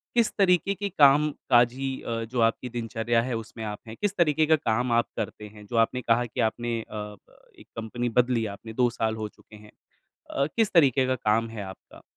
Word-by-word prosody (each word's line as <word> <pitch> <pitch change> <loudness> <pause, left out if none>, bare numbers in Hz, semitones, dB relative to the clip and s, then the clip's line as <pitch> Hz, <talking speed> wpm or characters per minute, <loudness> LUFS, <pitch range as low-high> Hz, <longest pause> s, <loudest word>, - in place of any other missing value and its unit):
किस 235 -2 +3
तरीके 190 0 +3
के 200 +2 -3
कामकाजी 135 -4 +3
अ, 115 -1 -3
जो 125 - -2
आपकी 115 +2 +1
दिनचर्या 115 0 -1
है, 125 0 -3
उसमें 110 0 -8
आप 105 -1 -5
हैं? 110 - -8
किस 205 -1 0
तरीके 155 -2 +3
का 160 +1 +5
काम 125 -3 -1
आप - - -13
करते 105 - -5
हैं? 105 0 -14
जो 115 - -7
आपने 120 +3 +2
कहा 115 +1 +2
कि 115 - -4
आपने 120 0 -4
अ, - - -11
प 105 -1 -8 0.2
एक - - -16
कंपनी 120 +2 -3
बदली 120 -1 +2
आपने, 110 +3 -10
2 125 +1 +2
साल 110 -2 -2
हो 110 -1 -4
चुके 110 - -18
हैं। 105 0 -15 0.6
अ, 140 - 0
किस 225 -2 +2
तरीके 135 -6 +4
का 130 - +1
काम 115 0 +1
है 110 -2 -7
आपका? 95 0 -12
120 Hz, 205 wpm, -26 LUFS, 110-135 Hz, 0.6 s, का